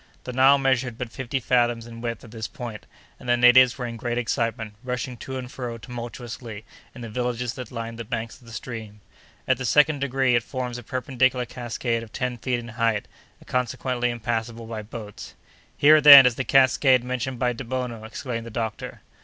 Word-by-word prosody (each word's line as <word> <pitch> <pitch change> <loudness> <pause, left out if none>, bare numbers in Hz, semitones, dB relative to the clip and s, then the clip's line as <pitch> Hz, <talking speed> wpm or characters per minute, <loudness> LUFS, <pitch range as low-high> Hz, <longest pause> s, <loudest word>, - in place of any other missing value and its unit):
The 125 - -6
Nile 135 +2 +6
measured 130 -3 0
but 125 -2 -5
fifty 130 +1 -3
fathoms 120 -2 +1
in 115 -1 -10
width 115 -2 -4
at 115 - -13
this 110 -1 -5
point, 120 -7 -8 0.3
and 125 - -8
the 120 - +4
natives 125 +1 +6
were 125 - -4
in 115 -1 -6
great 120 +1 -3
excitement, 115 -2 -2
rushing 125 0 -4
to 130 +3 -6
and 125 -1 -7
fro, 120 -3 -5
tumultuously, 120 -2 -8 0.3
in 125 - -9
the 115 - -6
villages 125 0 -2
that 125 - -8
lined 115 -1 -6
the - - -3
banks 115 +1 -5
of 120 - -18
the - - -11
stream. 110 -3 -8 0.5
At - - +2
the - - -3
second 150 +3 +4
degree 135 -2 +1
it 120 - +3
forms 125 0 -5
a - - -11
perpendicular 130 0 0
cascade 120 -1 -3
of 115 -2 -11
ten 125 -1 -3
feet 125 +1 -1
in 120 0 -8
height, 115 -2 0 0.3
and - - -19
consequently 125 0 -1
impassable 115 0 -3
by 110 -1 -5
boats. 105 -1 -9 0.4
"Here, 155 +1 +6
then, 140 -2 +11
is 125 - +4
the 130 - -3
cascade 130 -1 +4
mentioned 125 0 -3
by 125 0 0
Debono!" 125 -2 -4
exclaimed 115 +1 -5
the - - -6
doctor. 110 -1 -5
120 Hz, 195 wpm, -24 LUFS, 115-130 Hz, 0.5 s, then